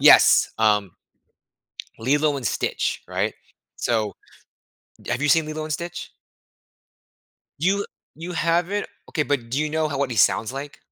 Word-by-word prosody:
Yes, - - +7
um, 105 -3 +3 1.1
Lilo 145 +5 +2
and 130 - -6
Stitch, - - -1
right? - - -1 0.4
So 110 -3 0 0.9
D - - -7
Have - - 0
you 150 - +2
seen 160 +2 +5
Lilo 155 0 -4
and 155 - -4
Stitch? 170 +3 -5 1.5
You 195 +6 +1 0.3
you 170 +3 -7
haven't? 175 +4 +1 0.2
Okay, 155 - +1
but 125 -4 -1
do 130 - 0
you 155 0 0
know 155 0 0
how 140 - -3
what 140 -2 0
he 115 - -3
sounds 110 +4 +3
like? 140 +2 -7
150 Hz, 150 wpm, -23 LUFS, 125-160 Hz, 1.5 s, Yes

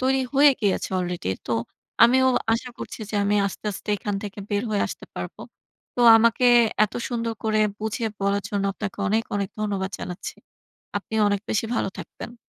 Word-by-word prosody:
তৈরি 265 +1 +2
হয়ে 285 +1 +7
গিয়েছে 200 -3 0
আলরেডি 180 - -3 0.2
তো, - - -1 0.5
আমিও 260 +3 +6 0.3
আশা 235 +3 -1
করছি - - -7
যে - - -6
আমি 205 +1 +2
আস্তে, 195 - -7
আস্তে 195 - -10
এখান 205 +1 -3
থেকে 205 -1 -7
বের 205 +1 +1
হয়ে 205 - +1
আসতে - - -8
পারবো। - - -6 0.5
তো - - -2 0.2
আমাকে 230 +2 +3 0.4
এত 210 - -6 0.2
সুন্দর 230 -2 -2
করে 215 -1 +1 0.2
বুঝিয়ে 220 +1 -2
বলার 200 +1 +1
জন্য 200 -1 -1
আপনাকে 205 0 -6
অনেক, 220 +3 +2
অনেক 200 -2 -1
ধন্যবাদ 200 -2 -2
জানাচ্ছি 180 0 -6 0.6
আপনি 210 - -9
অনেক 200 -1 0
বেশি 220 - +1
ভালো - - 0
থাকবেন। 235 - -8
210 Hz, 175 wpm, -24 LUFS, 200-230 Hz, 0.6 s, হয়ে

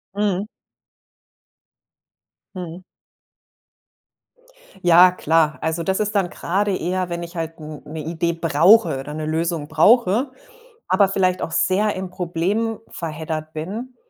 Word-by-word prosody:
Mhm. 205 -1 0 2.1
Mhm. 180 0 -7 2.0
Ja 175 +1 +7
klar, 160 -3 +1
also, 160 +1 -2
das 190 +3 0
ist 210 0 -1
dann 190 -3 +1
grade 195 +2 -1
eher, 180 +1 -2
wenn 170 0 -4
ich 170 +1 -10
halt 165 -1 -4
n 150 -1 -9
'ne 155 +2 -7
Idee 170 +1 -1
brauche 165 +2 +4
oder 145 +2 -7
'ne 155 0 -4
Lösung 160 -1 -2
brauche, 225 - +3 0.6
aber 200 - +4
vielleicht 185 -2 +1
auch 165 - -3
sehr 200 +5 +1
im 185 -1 -5
Problem 185 +6 -2
verheddert 155 -1 -5
bin. 215 +11 -6
175 Hz, 125 wpm, -21 LUFS, 160-195 Hz, 2.1 s, Ja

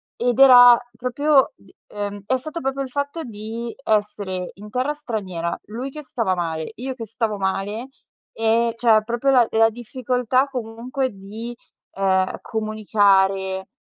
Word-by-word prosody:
Ed 245 0 0
era 245 -3 +9 0.2
proprio 270 - +2
d - - -22 0.2
ehm, 205 -1 -5
è 260 - +2
stato 310 +6 -6
proprio 270 +1 -2
il 265 - -7
fatto 285 +4 -3
di 225 +1 -6
essere 205 -4 -1
in 210 +2 -11
terra 255 +6 -1
straniera, 195 - -4
lui 240 +5 -5
che 300 +2 -9
stava 230 -8 -1
male, 165 -2 -3
io 260 +2 -4
che 230 -3 -6
stavo 220 -1 -2
male, 200 +5 -2 0.5
e 225 +1 +1
cioè 225 -2 +4
proprio 240 +4 +1
la 245 -3 +5
la 225 0 +4
difficoltà 250 +2 0
comunque 250 +1 -3
di, 210 +5 -8 0.4
uhm, 190 -1 +1
comunicare, 195 -3 +1
225 Hz, 145 wpm, -22 LUFS, 205-255 Hz, 0.5 s, era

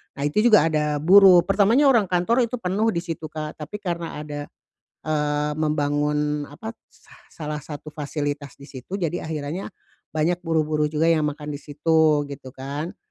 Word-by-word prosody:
nah, 140 - -4
itu 150 +8 +1
juga 215 -6 +6
ada 150 -1 0
buruh. 180 +3 +7
Pertamanya 215 +9 +4
orang 225 -7 +3
kantor 180 +8 +1
itu 250 - -4
penuh 210 0 -1
di 170 -5 0
situ, 165 -2 -5
Kak, 155 0 -7
tapi 205 +8 -7
karena 170 -2 -3
ada, 145 -1 -6 0.6
eee, 150 -1 0
membangun 150 -1 0
apa, 220 +10 -8 0.2
sah - - -21
salah 150 -1 -6
satu 150 +1 -9
fasilitas 145 -2 -4
di 140 - -13
situ, 140 +8 -7
jadi 170 -3 -3
akhirannya 155 +4 -4 0.4
banyak 165 +3 0
buruh-buruh 155 -2 0
juga 155 +1 0
yang 155 -2 +3
makan 150 0 -6
di 145 - -6
situ 155 0 +2
gitu 130 -1 -9
kan, 140 +6 -6
155 Hz, 165 wpm, -23 LUFS, 150-175 Hz, 0.6 s, buruh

